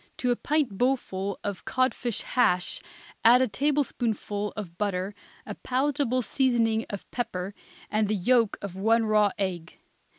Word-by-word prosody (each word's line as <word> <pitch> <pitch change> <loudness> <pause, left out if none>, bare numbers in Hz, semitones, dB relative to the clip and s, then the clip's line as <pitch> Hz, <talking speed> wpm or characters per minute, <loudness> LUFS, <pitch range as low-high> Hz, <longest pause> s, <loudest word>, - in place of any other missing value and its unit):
To 250 - +1
a - - +3
pint 280 -8 -1
bowlful 200 -7 0
of 200 -3 -4
codfish 255 -3 0
hash 180 -8 +1 0.4
add 245 +3 +7
a - - +1
tablespoonful 230 -6 -1
of 185 -5 -6
butter, 195 -1 -1 0.3
a - - -5
palatable 260 -1 0
seasoning 230 -2 +1
of 200 - -6
pepper 195 -5 -3 0.3
and 215 0 +1
the 215 - +1
yolk 230 +2 +2
of 195 -3 -5
one 225 +4 +3
raw 210 -1 +4
egg. 180 -4 -3
220 Hz, 140 wpm, -27 LUFS, 200-255 Hz, 0.4 s, add